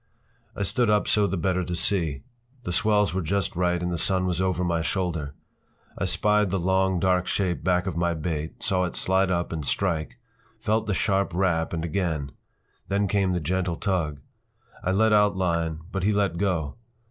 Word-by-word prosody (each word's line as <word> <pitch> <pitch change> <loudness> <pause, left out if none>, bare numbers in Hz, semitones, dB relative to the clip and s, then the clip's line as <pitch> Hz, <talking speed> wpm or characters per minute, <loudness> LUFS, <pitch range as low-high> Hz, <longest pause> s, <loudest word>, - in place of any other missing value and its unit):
I 100 - -2
stood 120 +4 +1
up 105 -1 +2
so 105 -2 +3
the 95 +1 -2
better 90 +2 0
to 90 0 -3
see. 85 -7 0 0.4
The 90 - -3
swells 105 +1 +2
were 95 - 0
just 95 +3 -1
right 90 0 +1
and 90 - -1
the 85 - -2
sun 95 +2 +2
was 90 -1 0
over 90 -1 0
my 85 -2 0
shoulder. 80 -5 -2 0.6
I - - -2
spied 105 -1 +2
the 95 - 0
long, 95 +1 +1
dark 90 0 +2
shape 90 -3 -1
back 90 -1 +2
of 95 -4 -3
my 85 0 0
bait, 80 -1 -4
saw 90 -1 +2
it 90 - -5
slide 95 0 +2
up 85 -1 -1
and 80 -2 -3
strike, 80 +2 -1 0.4
felt 110 +1 0
the 100 - 0
sharp 100 -3 +1
rap—and 85 -3 0
again. 80 -5 -2 0.6
Then 100 +1 +1
came 95 -1 +1
the 90 - 0
gentle 90 +2 -1
tug. 80 -7 -2 0.6
I 95 - 0
let 110 +3 +3
out 105 -1 +4
line, 85 -3 -1
but 95 - -2
he 100 +3 +2
let 100 -4 0
go. 90 -6 -1
90 Hz, 190 wpm, -25 LUFS, 85-100 Hz, 0.6 s, out